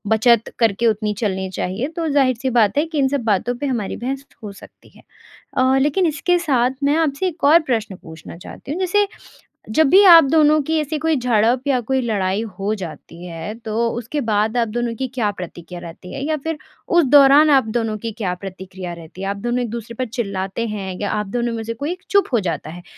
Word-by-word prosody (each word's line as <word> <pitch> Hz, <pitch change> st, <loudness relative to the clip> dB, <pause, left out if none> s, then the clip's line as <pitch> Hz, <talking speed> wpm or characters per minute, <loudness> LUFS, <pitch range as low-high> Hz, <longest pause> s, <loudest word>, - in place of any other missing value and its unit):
बचत 230 Hz, 0 st, +3 dB
करके 230 Hz, 0 st, +2 dB
उतनी 215 Hz, -1 st, 0 dB
चलनी 190 Hz, -4 st, -2 dB
चाहिए 190 Hz, +6 st, -3 dB
तो 330 Hz, -1 st, -2 dB
ज़ाहिर-सी 260 Hz, -3 st, +1 dB
बात 215 Hz, +2 st, +3 dB
है 295 Hz, -, +3 dB
कि 320 Hz, -1 st, -6 dB
इन 270 Hz, -, +3 dB
सब 275 Hz, -2 st, -2 dB
बातों 225 Hz, +3 st, 0 dB
पे 285 Hz, -, -4 dB
हमारी 240 Hz, -7 st, -2 dB
बहस 270 Hz, +3 st, -4 dB, 0.2 s
हो 210 Hz, -, -6 dB
सकती 200 Hz, -, -16 dB
है। -, -, -19 dB, 0.5 s
अ, 260 Hz, +1 st, +3 dB
लेकिन 300 Hz, +7 st, +2 dB
इसके 335 Hz, +3 st, +1 dB
साथ 260 Hz, -7 st, +1 dB
मैं 285 Hz, +1 st, +3 dB
आपसे 320 Hz, +2 st, 0 dB
एक 345 Hz, -2 st, -7 dB
और 305 Hz, +4 st, +7 dB
प्रश्न 220 Hz, -5 st, -1 dB
पूछना 160 Hz, 0 st, -11 dB
चाहती 225 Hz, +9 st, -10 dB
हूँ। 325 Hz, -, -3 dB
जैसे, 400 Hz, +2 st, +2 dB, 0.6 s
जब 315 Hz, +6 st, +3 dB
भी 385 Hz, +5 st, +7 dB
आप 335 Hz, -3 st, +9 dB
दोनों 310 Hz, -1 st, +4 dB
की 315 Hz, +3 st, 0 dB
ऐसी 305 Hz, +1 st, -3 dB
कोई 320 Hz, 0 st, +1 dB
झड़प 240 Hz, 0 st, +2 dB
या 265 Hz, -3 st, +2 dB
कोई 265 Hz, +3 st, -1 dB
लड़ाई 205 Hz, -4 st, -1 dB, 0.2 s
हो 200 Hz, +2 st, -1 dB
जाती 170 Hz, -2 st, -9 dB
है 165 Hz, +4 st, -6 dB
तो 225 Hz, +2 st, 0 dB
उसके 240 Hz, +6 st, -4 dB
बाद 220 Hz, -1 st, 0 dB
आप 235 Hz, -2 st, +1 dB
दोनों 235 Hz, +1 st, -2 dB
की 260 Hz, +3 st, -3 dB
क्या 225 Hz, -5 st, 0 dB
प्रतिक्रिया 175 Hz, -2 st, -9 dB
रहती 170 Hz, +2 st, -10 dB
है? -, -, -5 dB
या 310 Hz, +1 st, 0 dB
फ़िर 320 Hz, +2 st, -4 dB, 0.3 s
उस 345 Hz, -1 st, +4 dB
दौरान 285 Hz, +2 st, +6 dB
आप 270 Hz, -3 st, +5 dB
दोनों 225 Hz, -2 st, -1 dB
की 225 Hz, +1 st, -5 dB
क्या 200 Hz, -5 st, -3 dB
प्रतिक्रिया 185 Hz, -1 st, -8 dB
रहती 170 Hz, +2 st, -11 dB
है? 195 Hz, -, -2 dB
आप 200 Hz, -, -2 dB
दोनों 240 Hz, +4 st, -2 dB
एक-दूसरे 235 Hz, 0 st, -6 dB
पर 255 Hz, -, -1 dB
चिल्लाते 200 Hz, -2 st, -3 dB
हैं 190 Hz, -3 st, -5 dB
या 205 Hz, -, -2 dB
आप 210 Hz, 0 st, -2 dB
दोनों 235 Hz, +3 st, -2 dB
में 225 Hz, -1 st, -4 dB
से 230 Hz, +1 st, -4 dB
कोई 285 Hz, +8 st, -3 dB
एक 365 Hz, +1 st, -9 dB
चुप 400 Hz, 0 st, +3 dB
हो 235 Hz, -, +3 dB
जाता 165 Hz, -5 st, -4 dB
है? 175 Hz, +2 st, -10 dB
235 Hz, 220 wpm, -20 LUFS, 200-280 Hz, 0.6 s, आप